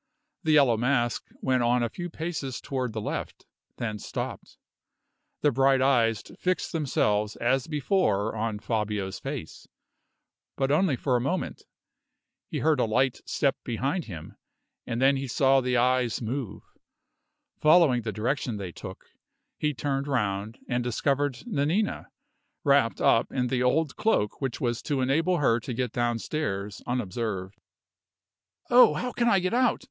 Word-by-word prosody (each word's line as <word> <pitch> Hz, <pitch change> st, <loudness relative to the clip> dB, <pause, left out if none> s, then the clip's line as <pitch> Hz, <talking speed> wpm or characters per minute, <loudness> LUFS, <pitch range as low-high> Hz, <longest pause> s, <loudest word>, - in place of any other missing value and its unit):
The 155 Hz, -, +2 dB
Yellow 135 Hz, -6 st, +5 dB
Mask 120 Hz, 0 st, 0 dB
went 130 Hz, -1 st, +1 dB
on 120 Hz, +1 st, +2 dB
a 120 Hz, -, 0 dB
few 175 Hz, +4 st, -5 dB
paces 160 Hz, -6 st, -4 dB
toward 130 Hz, -3 st, -3 dB
the 110 Hz, -, -4 dB
left, -, -, -5 dB, 0.3 s
then 110 Hz, -3 st, -3 dB
stopped. -, -, -6 dB, 0.8 s
The 145 Hz, -, +4 dB
bright 135 Hz, +1 st, +3 dB
eyes 120 Hz, -5 st, +2 dB, 0.2 s
fixed 185 Hz, 0 st, -1 dB
themselves 105 Hz, -, 0 dB
as 125 Hz, +2 st, 0 dB
before 140 Hz, -, +1 dB
on 110 Hz, -1 st, -2 dB
Fabio's 105 Hz, -3 st, -2 dB
face, -, -, -7 dB, 0.9 s
but 135 Hz, 0 st, +1 dB
only 155 Hz, -1 st, +3 dB
for 125 Hz, +1 st, 0 dB
a 120 Hz, -, +2 dB
moment. 140 Hz, +9 st, -3 dB, 0.8 s
He -, -, -3 dB
heard 155 Hz, -3 st, +3 dB
a -, -, +3 dB
light 130 Hz, +4 st, +1 dB
step 140 Hz, -2 st, +1 dB
behind 135 Hz, -, -2 dB
him, 80 Hz, -7 st, -9 dB, 0.5 s
and 115 Hz, -, -2 dB
then 135 Hz, +1 st, +4 dB
he 135 Hz, 0 st, -4 dB
saw 135 Hz, +2 st, +3 dB
the 125 Hz, 0 st, 0 dB
eyes 125 Hz, -1 st, +2 dB
move. 120 Hz, 0 st, -4 dB, 1.0 s
Following 155 Hz, -6 st, +5 dB
the 110 Hz, -1 st, -3 dB
direction 120 Hz, +1 st, -2 dB
they 95 Hz, -3 st, -5 dB
took, -, -, -10 dB, 0.5 s
he 150 Hz, -, +1 dB
turned 140 Hz, +1 st, -2 dB
round, 105 Hz, -5 st, -1 dB
and 120 Hz, -1 st, 0 dB
discovered 135 Hz, +3 st, 0 dB
Nanina, 185 Hz, 0 st, 0 dB, 0.6 s
wrapped 140 Hz, -5 st, +3 dB
up 115 Hz, -, +3 dB
in 125 Hz, -2 st, -1 dB
the 125 Hz, -1 st, 0 dB
old 140 Hz, +3 st, +1 dB
cloak 215 Hz, -, 0 dB
which 135 Hz, -3 st, -2 dB
was 120 Hz, -2 st, -1 dB
to 140 Hz, -3 st, -1 dB
enable 160 Hz, +8 st, +2 dB
her 120 Hz, -6 st, +3 dB
to 120 Hz, +1 st, -6 dB
get 125 Hz, -1 st, -1 dB
downstairs 115 Hz, -4 st, -2 dB
unobserved. 105 Hz, -5 st, -3 dB, 1.1 s
"Oh, 245 Hz, +1 st, +7 dB
how 250 Hz, -, -2 dB
can 235 Hz, -1 st, +1 dB
I 200 Hz, -, +5 dB
get 185 Hz, +2 st, 0 dB
out? 250 Hz, 0 st, +3 dB
130 Hz, 150 wpm, -27 LUFS, 115-145 Hz, 1.1 s, Oh